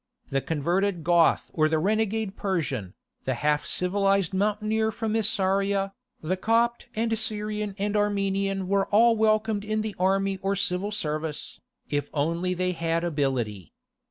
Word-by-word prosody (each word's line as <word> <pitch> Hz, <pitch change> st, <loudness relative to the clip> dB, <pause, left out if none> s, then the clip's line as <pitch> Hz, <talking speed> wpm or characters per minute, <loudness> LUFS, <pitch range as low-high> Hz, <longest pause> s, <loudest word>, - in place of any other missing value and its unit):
The 135 Hz, 0 st, +1 dB
converted 175 Hz, +4 st, 0 dB
Goth 170 Hz, 0 st, +3 dB
or 155 Hz, -1 st, +2 dB
the 160 Hz, -, +2 dB
renegade 215 Hz, +3 st, 0 dB
Persian, 140 Hz, -, -2 dB, 0.3 s
the 130 Hz, -, 0 dB
half 150 Hz, +4 st, 0 dB
civilized 195 Hz, 0 st, +1 dB
mountaineer 215 Hz, +2 st, +1 dB
from 220 Hz, 0 st, -3 dB
Isauria, 195 Hz, -2 st, +1 dB, 0.3 s
the 175 Hz, +4 st, 0 dB
Copt 230 Hz, +4 st, +1 dB
and 225 Hz, +1 st, +1 dB
Syrian 210 Hz, -2 st, -2 dB
and 205 Hz, +1 st, -1 dB
Armenian 195 Hz, -2 st, 0 dB
were 195 Hz, 0 st, +1 dB
all 230 Hz, +3 st, +5 dB
welcomed 215 Hz, -1 st, +2 dB
in 215 Hz, +1 st, -1 dB
the 215 Hz, -2 st, -4 dB
army 195 Hz, +1 st, +1 dB
or 195 Hz, +1 st, 0 dB
civil 195 Hz, +1 st, 0 dB
service, 155 Hz, -6 st, -3 dB, 0.3 s
if 145 Hz, -1 st, -1 dB
only 170 Hz, +5 st, 0 dB
they 180 Hz, +1 st, 0 dB
had 165 Hz, -1 st, -1 dB
ability. 130 Hz, -, -2 dB
195 Hz, 140 wpm, -26 LUFS, 165-210 Hz, 0.3 s, all